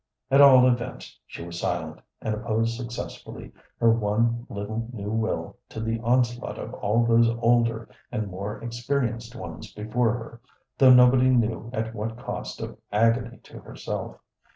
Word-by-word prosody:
At 135 +1 +7
all 130 -2 +8
events 120 -1 -3
she 85 - -8
was 85 0 -7
silent, 80 -3 -3 0.2
and 110 - -1
opposed 115 +1 -1
successfully 120 0 -7 0.3
her 115 -1 +5
one 115 +2 0
little 110 +3 -4
new 105 -3 -5
will 110 0 -2
to - - -7
the 115 +1 -2
onslaught 120 +1 0
of - - -7
all 115 +4 +1
those 115 0 +4
older 115 -1 +2 0.2
and 110 - -2
more 100 +2 -5
experienced 120 0 -2
ones 80 -8 -8
before 110 +2 0
her, 115 0 -8 0.4
though 130 -1 +8
nobody 125 +1 +6
knew 115 -2 +1
at 110 -2 -3
what 110 +1 -4
cost - - -6
of - - -7
agony 115 +4 +2
to - - -12
herself. - - -6
115 Hz, 155 wpm, -25 LUFS, 110-120 Hz, 0.4 s, all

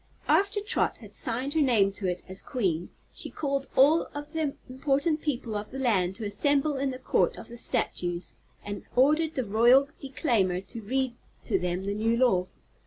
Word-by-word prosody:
After 400 +1 +3
Trot 415 - 0
had - - -14
signed 255 +2 +1
her 320 - +2
name 225 -8 +3
to 195 -1 -4
it 180 0 -3
as 190 +1 -4
Queen 180 - -2 0.2
she - - -4
called 275 -2 -2
all 300 +5 +5
of 290 +2 -7
the 310 -3 -1
important 280 +4 0
people 245 -7 -3
of 205 0 -4
the 265 - -7
land 195 -8 +1
to 225 - -5
assemble 285 +7 +2
in 270 0 -1
the 255 - -5
Court 255 - +1
of - - -10
the 235 - -9
Statues 175 -4 -1 0.3
and 205 -1 -5
ordered 305 +5 +3
the 260 - -1
Royal 240 +7 +5
Declaimer 240 - 0
to 225 +4 -9
read 260 +3 -1 0.3
to 195 -5 +1
them 180 +1 -2
the 200 - -1
new 225 +3 +1
law. 190 -8 +3
250 Hz, 185 wpm, -27 LUFS, 200-280 Hz, 0.3 s, all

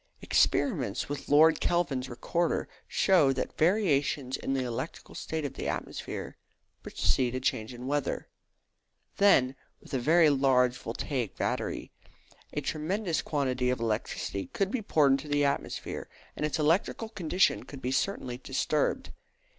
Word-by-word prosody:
Experiments 130 - +1
with 145 0 -6
Lord 155 +2 +6
Kelvin's 140 -7 0
recorder 165 +8 -1 0.2
show 175 -8 +4
that 130 - -3
variations 150 -7 +2
in 135 - -2
the 130 - 0
electrical 125 +5 -5
state 160 -2 -4
of 140 - -4
the - - -5
atmosphere - - -5 0.4
precede 120 - 0
a - - -1
change 130 -3 -1
of 120 -1 -9
weather. 140 +2 -2 0.9
Then, 135 -10 +5 0.2
with - - -15
a 130 - +1
very 160 +4 +5
large 130 -3 +3
voltaic 120 0 -4
battery, - - -2 0.6
a 150 - -2
tremendous 165 +5 -1
quantity 130 -4 0
of 125 - 0
electricity 105 -4 -2
could 195 - -1
be 255 - -1
poured 150 -9 +3
into 135 +2 +1
the 145 0 +2
atmosphere, 140 - -3 0.3
and 150 - -1
its 150 - -2
electrical 165 +8 +1
condition 190 -3 +1
could 140 - -10
be 130 -1 -2
certainly 130 -4 -1
disturbed. 135 +3 -1
140 Hz, 140 wpm, -29 LUFS, 130-160 Hz, 0.9 s, Lord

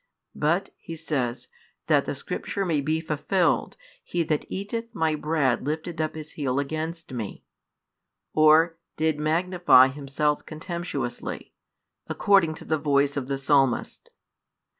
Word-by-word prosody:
But, 165 +6 0
He 165 - -8
says, 135 -7 -2 0.4
that - - +3
the - - -3
Scripture 195 - -3
may 160 -5 +1
be 155 +3 0
fulfilled, 165 +4 0 0.3
He 175 -1 -1
that 155 -2 -1
eateth 230 +4 -5
My 160 -1 +1
bread 150 -5 0
lifted 160 +3 -3
up 155 0 -2
his 155 -1 -7
heel 135 -4 -2
against 155 +2 -3
Me, 110 -5 -5 0.9
or, 160 +2 +5 0.2
did 155 -1 +1
magnify 165 -3 +5
himself 145 +2 -1
contemptuously, 170 +2 -5 0.5
according 195 -6 +3
to - - -10
the 155 -1 0
voice 145 -1 +2
of 135 -3 -3
the 140 0 -1
Psalmist. 135 -2 +1
155 Hz, 130 wpm, -26 LUFS, 140-165 Hz, 0.9 s, or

